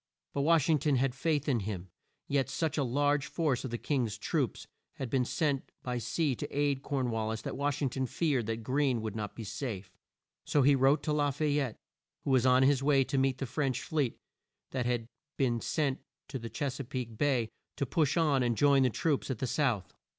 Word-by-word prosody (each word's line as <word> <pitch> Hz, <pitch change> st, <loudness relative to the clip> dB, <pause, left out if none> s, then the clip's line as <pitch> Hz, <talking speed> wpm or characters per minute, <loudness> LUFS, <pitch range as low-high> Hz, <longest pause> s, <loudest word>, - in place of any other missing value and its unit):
But 140 Hz, -, 0 dB
Wash 160 Hz, 0 st, +4 dB
ing 155 Hz, -3 st, +4 dB
ton 145 Hz, 0 st, +2 dB
had 130 Hz, 0 st, +1 dB
faith 150 Hz, +2 st, 0 dB
in 130 Hz, -5 st, +2 dB
him; 95 Hz, -3 st, -5 dB, 0.4 s
yet 140 Hz, -1 st, +1 dB
such 160 Hz, -4 st, -1 dB
a 145 Hz, -, +1 dB
large 145 Hz, +3 st, +1 dB
force 150 Hz, -7 st, 0 dB
of 130 Hz, -, -3 dB
the 120 Hz, -, -3 dB
King's 120 Hz, -6 st, -1 dB
troops -, -, -1 dB, 0.3 s
had 130 Hz, -4 st, -5 dB
been 130 Hz, -2 st, +2 dB
sent 140 Hz, 0 st, -1 dB
by 125 Hz, -1 st, -2 dB
sea 130 Hz, +5 st, 0 dB
to -, -, -4 dB
aid 145 Hz, -1 st, 0 dB
Corn 135 Hz, -4 st, -1 dB
wal 110 Hz, -1 st, -1 dB
lis 110 Hz, 0 st, -4 dB
that -, -, -4 dB
Wash 145 Hz, 0 st, -1 dB
ing 135 Hz, -, +2 dB
ton 130 Hz, 0 st, -1 dB
feared 135 Hz, -6 st, 0 dB
that 115 Hz, 0 st, -3 dB
Greene 130 Hz, -2 st, +1 dB
would 110 Hz, -1 st, -4 dB
not 105 Hz, -2 st, -4 dB
be 115 Hz, -, -6 dB
safe. 105 Hz, -4 st, -5 dB, 0.5 s
So 145 Hz, -, +2 dB
he 140 Hz, +2 st, +6 dB
wrote 135 Hz, +2 st, +4 dB
to 155 Hz, -, 0 dB
La 145 Hz, -1 st, +2 dB
fay 145 Hz, +1 st, +1 dB
ette, 130 Hz, -6 st, -2 dB, 0.5 s
who 140 Hz, -, -1 dB
was 130 Hz, -1 st, +4 dB
on 130 Hz, +1 st, +6 dB
his 135 Hz, 0 st, +4 dB
way 140 Hz, -1 st, +4 dB
to 135 Hz, +2 st, -2 dB
meet 135 Hz, -1 st, +2 dB
the 135 Hz, -, -3 dB
French 135 Hz, -1 st, -1 dB
fleet 145 Hz, -6 st, -1 dB, 0.5 s
that 125 Hz, -2 st, -1 dB
had 120 Hz, -2 st, 0 dB, 0.3 s
been 120 Hz, -5 st, +1 dB
sent 140 Hz, -4 st, 0 dB, 0.3 s
to 135 Hz, -1 st, -4 dB
Ches 140 Hz, +1 st, -3 dB
a -, -, -2 dB
peake 120 Hz, -2 st, -5 dB
Bay, 125 Hz, -3 st, +1 dB, 0.3 s
to 140 Hz, -, -1 dB
push 150 Hz, +4 st, +1 dB
on 150 Hz, -5 st, +3 dB
and 120 Hz, -2 st, +1 dB
join 140 Hz, -1 st, +5 dB
the 130 Hz, -, +4 dB
troops 145 Hz, +5 st, 0 dB
at 130 Hz, -, -1 dB
the 130 Hz, -, -2 dB
South. 125 Hz, -, 0 dB
135 Hz, 220 wpm, -31 LUFS, 120-145 Hz, 0.5 s, he